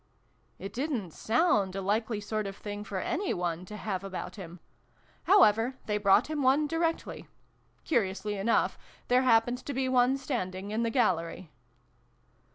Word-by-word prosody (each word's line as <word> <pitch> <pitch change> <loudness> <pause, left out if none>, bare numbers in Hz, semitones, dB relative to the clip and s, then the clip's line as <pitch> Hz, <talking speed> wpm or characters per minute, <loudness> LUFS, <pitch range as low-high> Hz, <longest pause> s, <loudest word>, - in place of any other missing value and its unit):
" - - -40
It 195 - -6
didn't 250 - -2
sound 215 - +1
a - - -2
likely 215 +3 -1
sort 215 0 -3
of 195 0 -7
thing 205 0 -6
for 200 -1 -5
any 380 - -1
one 175 0 -3
to 210 +3 -8
have 195 -3 -3
about 195 -1 -6
him; 175 -3 -9 0.7
however, 255 - +5
they 210 -1 -1
brought 205 +3 +4
him 305 -1 -3
one 270 +3 +3
directly: 330 +1 -2 0.6
curiously 205 - -1
enough, 205 +4 +1 0.3
there 250 +1 +5
hap 225 -3 +5
pened 245 +1 -4
to 285 - -4
be 265 0 0
one 255 +1 +3
standing 200 -8 -4
in 220 +2 -1
the 230 - +1
gallery. 170 - 0
215 Hz, 165 wpm, -29 LUFS, 195-255 Hz, 0.7 s, however